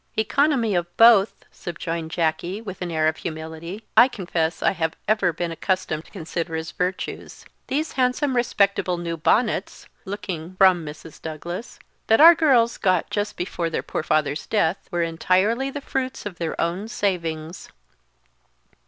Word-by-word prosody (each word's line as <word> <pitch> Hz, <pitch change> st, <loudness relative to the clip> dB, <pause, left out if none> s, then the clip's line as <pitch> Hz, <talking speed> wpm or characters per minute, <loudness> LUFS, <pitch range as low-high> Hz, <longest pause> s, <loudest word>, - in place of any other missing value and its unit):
"Economy 240 Hz, 0 st, +2 dB
of 175 Hz, -1 st, 0 dB
both," 225 Hz, -3 st, +5 dB
subjoined 165 Hz, -1 st, -5 dB
Jacky, 170 Hz, +4 st, -1 dB
with 195 Hz, -5 st, -8 dB
an 180 Hz, -, -3 dB
air 155 Hz, -1 st, +1 dB
of 155 Hz, 0 st, 0 dB
humility, 160 Hz, +5 st, -6 dB
"I 245 Hz, -, +8 dB
confess 175 Hz, -8 st, -2 dB
I -, -, +4 dB
have 160 Hz, -3 st, -2 dB
ever 210 Hz, -4 st, +2 dB
been 170 Hz, +1 st, -3 dB
accustomed 165 Hz, -2 st, -2 dB
to -, -, -19 dB
consider 170 Hz, -2 st, -4 dB
as 160 Hz, 0 st, -4 dB
virtues. 180 Hz, +1 st, -4 dB, 0.2 s
These 305 Hz, +4 st, -1 dB
handsome 255 Hz, +1 st, +1 dB
respectable 200 Hz, -6 st, +1 dB
new 170 Hz, -1 st, -3 dB
bonnets" 210 Hz, +5 st, 0 dB, 0.2 s
looking 185 Hz, -3 st, -6 dB
from 185 Hz, -3 st, +5 dB
Mrs. 155 Hz, +1 st, -10 dB
Douglas 170 Hz, +6 st, -6 dB, 0.3 s
"that 225 Hz, -, +5 dB
our 330 Hz, +3 st, +10 dB
girls 260 Hz, -8 st, +3 dB
got 185 Hz, -4 st, +1 dB
just 205 Hz, 0 st, -2 dB
before 175 Hz, -2 st, -2 dB
their -, -, -3 dB
poor -, -, -3 dB
father's 155 Hz, -1 st, 0 dB
death, 190 Hz, -4 st, 0 dB
were 175 Hz, -2 st, 0 dB
entirely 185 Hz, +10 st, +1 dB
the 285 Hz, +1 st, -6 dB
fruits 265 Hz, -3 st, -3 dB
of 190 Hz, -4 st, -7 dB
their 165 Hz, -2 st, -3 dB
own 175 Hz, +5 st, -1 dB
savings." 170 Hz, -7 st, -3 dB
180 Hz, 155 wpm, -23 LUFS, 165-220 Hz, 0.3 s, our